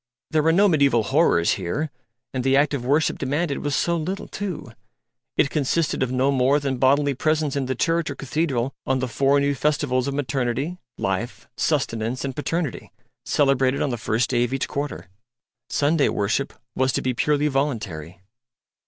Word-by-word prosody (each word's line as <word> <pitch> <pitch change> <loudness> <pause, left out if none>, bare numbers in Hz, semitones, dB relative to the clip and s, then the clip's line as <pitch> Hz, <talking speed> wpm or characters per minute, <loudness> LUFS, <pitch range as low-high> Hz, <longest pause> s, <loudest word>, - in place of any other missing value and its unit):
There 155 -1 +3
were 160 +2 +3
no 200 +5 +5
mediaeval 140 - +3
horrors 85 -4 +3
here; 145 - -2 0.4
and 130 -1 -2
the 135 +1 +3
act 145 +1 +3
of 135 -4 -2
worship 145 +5 +1
demanded 145 +2 -1
was 145 -2 -1
so 170 - +1
little, 175 +4 -3
too; 190 - -5 0.7
it 140 - +3
consisted 155 +2 0
of 130 -1 0
no 130 +2 +2
more 135 +2 +3
than 135 -2 -2
bodily 140 +2 +3
presence 155 +1 0
in 135 -2 -1
the 130 - -1
church 165 +4 +1
or 140 - -4
cathedral 135 -3 -1
on 130 - +2
the 130 0 -1
four 140 +3 +2
new 140 0 +1
festivals 140 -3 0
of 140 - -2
Maternity, 135 +4 -2 0.2
Life, 95 +6 -3
Sustenance 125 -4 -1
and 135 -2 -4
Paternity, 160 -2 -3 0.3
celebrated 135 -1 +2
on 140 - -1
the - - -1
first 115 +2 0
day 120 -1 +3
of 120 +2 -1
each 135 - -1
quarter. 140 -10 -4 0.6
Sunday 145 0 +2
worship 105 +7 -1 0.2
was 130 0 +1
to - - -1
be 130 - 0
purely 150 +4 +1
voluntary. 105 - -2
140 Hz, 175 wpm, -23 LUFS, 125-150 Hz, 0.7 s, no